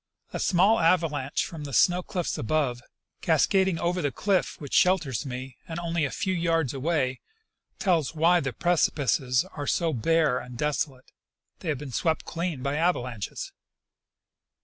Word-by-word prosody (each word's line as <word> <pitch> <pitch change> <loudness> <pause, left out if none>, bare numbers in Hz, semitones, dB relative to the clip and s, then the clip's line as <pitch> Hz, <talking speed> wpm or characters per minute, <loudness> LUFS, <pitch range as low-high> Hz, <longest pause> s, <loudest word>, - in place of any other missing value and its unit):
A - - -3
small 190 +4 +3
ava 170 +1 +4
lanche 145 -3 -2
from 160 -3 -8
the 140 -1 -7
snow 180 0 +4
cliffs 180 -1 -3
above, 125 -1 -1 0.4
cascading 190 -3 +2
over 175 +2 -1
the 145 -3 0
cliff 195 +4 0
which 145 -3 -8
shelters 160 - +2
me 130 0 -6
and 165 - -5
only 170 -2 -1
a - - -2
few 190 +3 -2
yards 165 -6 0
away, 135 -2 -1 0.6
tells 165 -6 +1
why 170 +3 +4
the 135 -4 -2
precipices 130 - +1
are 145 -1 -4
so 165 -2 +1
bare 150 +1 +2
and 125 -1 -9
desolate: 140 -2 -2 0.5
they 170 - -5
have 150 - 0
been 140 0 -8
swept 160 +7 0
clean 165 -6 -3
by 140 +1 -1
ava 180 +1 +3
lanches. 120 -4 -6
155 Hz, 160 wpm, -26 LUFS, 130-175 Hz, 0.6 s, ava